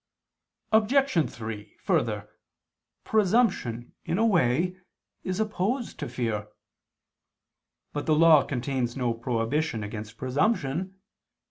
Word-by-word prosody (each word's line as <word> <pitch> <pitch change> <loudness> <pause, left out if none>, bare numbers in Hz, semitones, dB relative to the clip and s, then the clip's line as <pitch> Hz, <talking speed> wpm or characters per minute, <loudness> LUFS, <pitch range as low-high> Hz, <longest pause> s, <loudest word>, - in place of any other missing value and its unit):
Obj. 220 - +3
3: 110 -2 -7
Further, - - 0 0.8
presumption, 190 - +1
in 170 - -1
a 225 - +3
way, 175 - +2 0.5
is 185 +1 -2
opposed 220 +3 -1
to 145 - -4
fear. 110 -4 -2 1.5
But 145 - -4
the 155 - +4
Law 160 -2 +7
contains 125 -1 -2
no 125 -3 +1
prohibition 115 +2 -1
against 110 +1 -7
presumption. 155 - 0
145 Hz, 100 wpm, -27 LUFS, 120-190 Hz, 1.5 s, Law